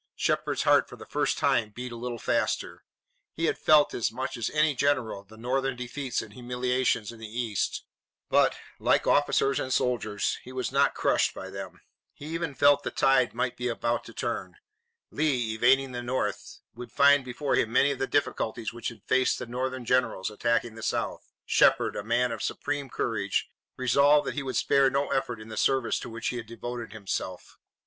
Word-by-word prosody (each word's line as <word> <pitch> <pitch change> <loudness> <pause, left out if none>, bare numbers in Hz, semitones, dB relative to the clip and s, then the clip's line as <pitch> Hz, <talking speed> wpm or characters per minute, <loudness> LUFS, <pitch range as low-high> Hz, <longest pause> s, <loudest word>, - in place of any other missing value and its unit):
Shepard's - - 0
heart - - +4
for - - -9
the - - -11
first - - 0
time 110 - +2
beat 125 +3 -7
a - - -6
little 120 0 -4
faster. - - -1 0.5
He 165 - -1
had - - +1
felt 150 -1 +5
as 115 - 0
much 130 +3 -4
as 115 -2 -2
any 150 0 +2
general 130 -7 0
the 110 +2 -16
Northern 130 +3 -1
defeats 125 +1 -3
and 110 -2 -13
humiliations 125 -2 -1
in 115 - -13
the 110 - -7
east, 110 -2 -2 0.4
but, - - +3 0.2
like - - +2
officers 140 -1 +3
and 130 - -3
soldiers, 110 -6 0
he 130 - -10
was 130 0 -3
not 140 +1 +3
crushed - - +1
by - - -7
them. - - -8 0.3
He 145 - -11
even 165 -4 -3
felt 145 0 +5
that - - -5
the - - -5
tide 130 -3 +3
might 120 0 -1
be 125 - -3
about 120 0 -1
to - - -10
turn. 95 -6 -3 0.6
Lee, 130 -7 0
invading 130 +4 +3
the 120 -1 -4
North, 130 +2 -3
would 120 0 -9
find 140 0 +5
before 130 +3 -3
him 110 - +2
many 140 +3 +4
of 140 - -4
the 135 - 0
difficulties 115 -5 -1
which 120 - -5
had 115 - -14
faced 130 0 +2
the 125 - -5
Northern 130 +1 -3
generals 120 -5 +1
attacking 115 +1 0
the 115 - -10
South. - - -3
Shepard, - - +3
a - - -4
man 120 +3 +1
of 115 - -5
supreme 145 -1 -3
courage, 105 -5 -1 0.3
resolved 140 +4 +4
that - - -2
he 150 - -3
would 130 -4 -3
spare 140 -1 +4
no 140 +2 -1
effort 135 -4 -1
in 110 +1 -11
the 110 - -7
service 135 -3 +1
to - - -7
which 115 0 -3
he 125 - -3
had 115 -2 -6
devoted 120 0 -6
himself. 100 -3 -5
125 Hz, 195 wpm, -27 LUFS, 115-135 Hz, 0.6 s, felt